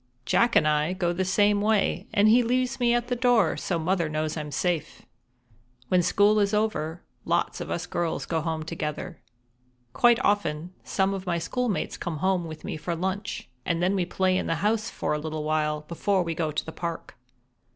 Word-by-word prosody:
Jack 235 - +3
and 155 - +5
I 150 +3 +2
go 175 -2 0
the 185 +2 -1
same 205 +2 +3
way, 210 -1 +1
and 205 +1 +4
he 235 +3 +6
leaves 255 +2 0
me 240 -1 +3
at 240 0 -1
the 245 - 0
door, 245 -2 +3
so 175 - -2
Mother 170 0 0
knows 155 0 -2
I'm 150 -2 -4
safe. 165 +1 -2 0.9
When 180 -1 +4
school 205 +4 +4
is 200 0 +2
over, 180 -6 -1 0.2
lots - - 0
of - - -5
us 175 - -2
girls 170 -1 -2
go 165 -1 -1
home 160 -1 -2
together. 160 +1 -5 0.7
Quite 240 - +5
often 180 -4 0
some 195 0 0
of 190 -1 -6
my 170 -1 +1
schoolmates 240 +5 -2
come 170 -3 -4
home 185 +1 +1
with 155 -1 -9
me - - -4
for 170 +2 -3
lunch, 190 - -3 0.2
and 170 +1 -1
then 185 +2 +2
we 185 -3 0
play 185 0 +1
in - - -3
the 165 - +1
house 220 +1 +1
for - - -2
a 150 - -1
little 155 0 -4
while 150 0 0
before 180 +4 0
we 165 -1 -2
go 160 -1 -1
to 150 - -2
the 160 - -6
park. 170 0 -5
180 Hz, 200 wpm, -26 LUFS, 160-205 Hz, 0.9 s, he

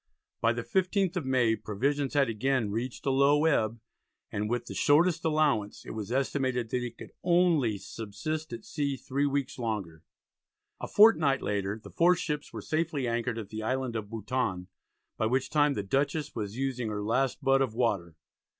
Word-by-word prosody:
By 115 - +4
the 120 0 -4
15th 190 - +1
of 165 -7 -2
May 125 -4 +3
provisions 135 +7 -1
had 140 -2 +4
again 115 -1 0
reached 120 +6 -4
a 135 - +2
low 140 +3 +4
ebb, 115 -7 +2 0.5
and 105 +1 -2
"with 120 0 -1
the - - -7
shortest 160 +3 +3
allowance" 150 -10 +1
it - - -7
was 110 0 -5
estimated 130 -3 0
that 125 - +1
they 120 0 -3
could - - -12
only 170 - +3
"subsist 120 +11 -5
at 115 -1 -7
sea 140 -2 -2
3 140 +3 -1
weeks 140 -1 -2
longer." 100 -9 -3 0.8
A - - -5
fortnight 160 -11 +5
later 100 +1 -2
the - - -11
four 175 +2 +4
ships 150 -4 -3
were - - -7
safely 155 -4 -1
anchored 120 0 -1
at 105 -3 -6
the 110 0 -5
island 130 +1 -2
of 105 -2 -4
Bouton, 110 -4 -2 0.5
by 110 - +1
which 130 +3 0
time 145 -2 +3
the 100 - -2
Dutchess 140 +7 -1
was 105 0 -5
using 130 -4 -2
her 105 -1 -3
last 130 +6 0
butt 135 0 +4
of 125 -5 0
water. 100 -9 0
130 Hz, 180 wpm, -29 LUFS, 110-145 Hz, 0.8 s, fortnight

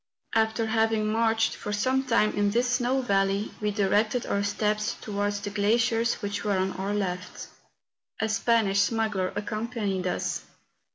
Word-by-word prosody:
After 225 0 +2
having 220 -1 +1
marched 225 0 +2
for 205 - -6
some 260 +6 +1
time 230 -4 +2
in 205 0 +1
this 240 +4 +1
snow 250 +2 +1
valley, 195 -1 +1
we 210 - +1
directed 210 +3 +1
our 200 - 0
steps 210 +1 0
towards 205 -1 -2
the 205 - -4
gla¬ 205 +2 +2
ciers 230 0 0
which 205 0 -3
were 205 -2 +1
on 190 +1 0
our 195 +2 -2
left. 185 -1 -4 0.7
A 220 - +1
Spanish 220 -2 +2
smuggler 205 -3 +1
accompanied 210 -3 -2
us. - - -2
215 Hz, 155 wpm, -27 LUFS, 200-225 Hz, 0.7 s, After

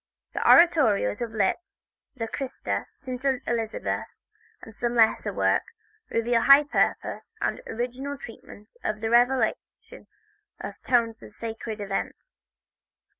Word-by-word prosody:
The - - -2
oratorios 270 - +5
of 235 - -2
Liszt, 215 - -2 0.3
the 225 -3 -3
"Christus," 265 +3 -4
"St. 255 -2 -8 0.2
Elizabeth" 225 -1 -2 0.6
and 220 - -12
some 240 0 -2
lesser 225 -2 +3
works, - - 0 0.4
reveal 230 0 +1
high 275 +3 +8
purpose 295 - -1
and - - -1
original 250 +4 -4
treatment 220 - -12
of 215 +1 -3
a 225 - 0
revelation 245 -1 0 0.5
in - - -6
tones 230 -2 +1
of - - -13
sacred 225 -1 -6
events. 200 - -5
235 Hz, 120 wpm, -26 LUFS, 220-260 Hz, 0.6 s, high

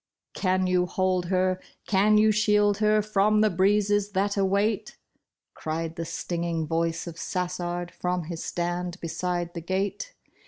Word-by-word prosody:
'' - - -63
Can 185 -1 +1
you 180 -1 +2
hold 185 -1 0
her, 185 0 +1 0.2
can 210 +2 +4
you 215 0 +5
shield 210 -1 +3
her 215 0 +3
from 210 0 +2
the 215 -1 +3
breezes 205 +2 +2
that 200 +1 +1
await? 200 +2 0 0.3
" - - -63
Cried 160 +1 -4
the 165 - -4
stinging 170 -1 -3
voice 165 +1 -1
of 170 -1 -8
Sassard 175 -1 -3
from 180 -1 -2
his 165 0 -6
stand 175 +1 -3
beside 175 +1 -3
the 170 - -5
gate. 195 - -3
185 Hz, 155 wpm, -26 LUFS, 175-205 Hz, 0.3 s, you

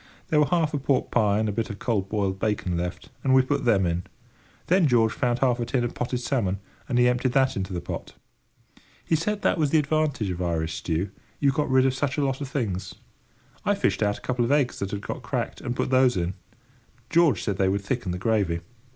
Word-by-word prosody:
There 155 - +3
were 150 - +4
half 165 -4 +1
a 145 - 0
pork 135 0 0
pie 105 -4 +3
and 110 0 +1
a - - 0
bit 110 +2 -2
of 105 - -6
cold 100 -5 -1
boiled 100 -3 -1
bacon 105 -4 -1
left, 90 +1 -4
and 130 -1 +4
we 130 - +6
put 140 +1 -1
them 100 -6 +4
in. 85 +1 -1 0.6
Then 180 -2 +4
George 115 -4 +3
found 120 -2 0
half 125 -1 +2
a 120 - -1
tin 125 0 0
of 120 - -2
potted 125 0 -2
salmon, 110 -8 0 0.3
and 125 - +1
he 125 0 +5
emptied 125 0 +1
that 135 -1 +3
into 95 0 -3
the 90 -2 -3
pot. - - -6 0.9
He 165 - +2
said 205 +6 -1
that - - +2
was 150 -2 +2
the 160 - +4
advantage 150 -8 0
of 90 0 -4
Irish 80 -2 -1
stew: 85 +4 -2 0.3
you 140 -1 +3
got 145 +1 -1
rid 130 0 +4
of 135 - +2
such 135 +1 -1
a 145 - +2
lot 135 +1 -2
of 140 - -3
things. 100 -10 -3 0.7
I - - +2
fished - - 0
out 105 -1 +1
a - - -15
couple 125 -1 0
of 120 - 0
eggs 145 -3 +2
that 100 - -2
had 100 0 -4
got - - -5
cracked, - - -3
and 120 - -3
put - - -1
those 130 -4 +4
in. 90 +1 -1 0.8
George 170 -4 +4
said 100 -4 -1
they 95 -1 +2
would 100 +1 0
thicken 100 -1 -2
the 90 - -3
gravy. 95 -4 0
120 Hz, 235 wpm, -25 LUFS, 100-135 Hz, 0.9 s, we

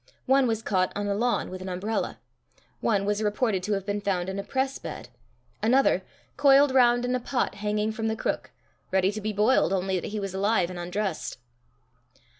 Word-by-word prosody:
One 265 0 +4
was 225 -1 -1
caught 185 -2 +1
on 205 - -2
a 200 - 0
lawn 235 +1 0
with 185 0 -7
an 185 - -5
umbrella; 195 +5 -2 0.6
one 200 -3 +1
was 205 +1 0
reported 210 -1 0
to 205 +3 -1
have 195 -1 -2
been 205 0 -2
found 190 -2 -1
in 190 +1 -4
a - - -3
press 265 +2 -1
bed; - - -7 0.5
another, 255 +5 +3 0.4
coiled 280 0 +6
round 245 -2 +4
in 250 - 0
a 255 - +1
pot 245 +1 -1
hanging 210 +1 -1
from 225 0 -3
the 220 - 0
crook - - -2 0.4
ready 190 0 +2
to 215 +1 -6
be 215 +1 -2
boiled, 210 -1 +3
only 190 -1 0
that - - -6
he 210 +1 -4
was 195 -2 -4
alive 190 -2 +1
and 180 - -7
undressed. 180 -2 -3
210 Hz, 200 wpm, -26 LUFS, 190-240 Hz, 0.6 s, coiled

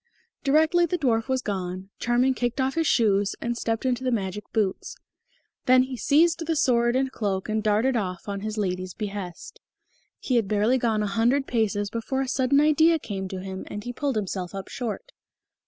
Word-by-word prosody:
Directly 315 +5 +4
the 355 - -1
dwarf 235 -7 +1
was 260 -1 0
gone, 185 -1 -4
Charming 245 +2 +2
kicked 245 0 -2
off 265 +1 +1
his 325 -1 0
shoes 205 -4 +2
and 235 0 -2
stepped 225 0 -2
into 255 0 0
the 255 - +1
magic 210 -3 -2
boots; 215 - -1 0.7
then 255 0 +6
he 260 0 -5
seized 325 +6 +3
the 325 - +1
sword 240 -5 +2
and 265 +1 +2
the 265 - -8
cloak 195 -5 -2
and 215 0 0
darted 215 +5 +2
off 185 -5 -3
on 200 -1 -3
his 215 +2 -4
lady's 185 -2 -2
behest. 200 -5 -6 0.6
He 255 - 0
had 225 -4 +1
barely 215 +5 +2
gone 220 -3 +1
a - - 0
hundred 235 +7 +1
paces 205 -4 0
before 250 +4 -2
a 270 - -2
sudden 260 +2 +2
idea 315 +2 +4
came 195 -9 -5
to 185 0 -6
him, 190 0 -6
and 205 - -6
he 245 - -5
pulled 275 0 -2
himself 195 -3 -3
up 195 -1 -6
short. 245 - -5
230 Hz, 195 wpm, -25 LUFS, 200-265 Hz, 0.7 s, then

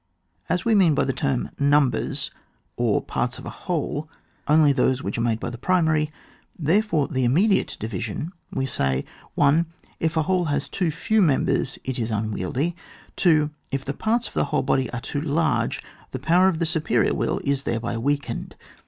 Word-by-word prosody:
As - - 0
we 230 - +3
mean 180 -7 +5
by - - +2
the 135 - 0
term 135 -3 -1
numbers, 140 -2 +2 0.4
or 120 -4 +1
part« 120 +1 -2
of - - -10
a - - -5
whole, 155 -3 -3 0.4
only 150 -1 +5
those 130 -1 +1
which 100 - -3
are - - +1
made 115 -1 +1
by 120 - -4
the 120 - -8
primary, 155 -1 +2 0.5
therefore 165 -1 +2
the 130 -1 -1
im 120 +1 +3
mediate 200 +3 +2
division, 110 - -4 0.2
we 135 - -1
say. 70 - -1 0.3
1. 150 +4 +4 0.3
If 160 0 0
a 160 - +3
whole 180 +2 +1
has 145 -2 -1
too 180 -4 0
few 210 +7 +1
members 145 -3 +1
it 130 -1 -3
is 115 -1 -1
unwieldy. 110 - -1 0.4
2. 155 -4 +3 0.2
If 135 -1 -3
the 140 - -2
parts 230 - 0
of - - -13
a - - +2
whole 140 - 0
body 130 -2 +1
are 125 - -5
too 140 - -3
large, 160 +1 0 0.3
the - - -4
power 170 +8 +4
of 175 - -1
the 170 - 0
superior 160 -1 +1
will - - 0
is 140 -1 +1
thereby 115 -2 -2
weakened. 145 +4 -2
145 Hz, 185 wpm, -24 LUFS, 125-165 Hz, 0.5 s, mean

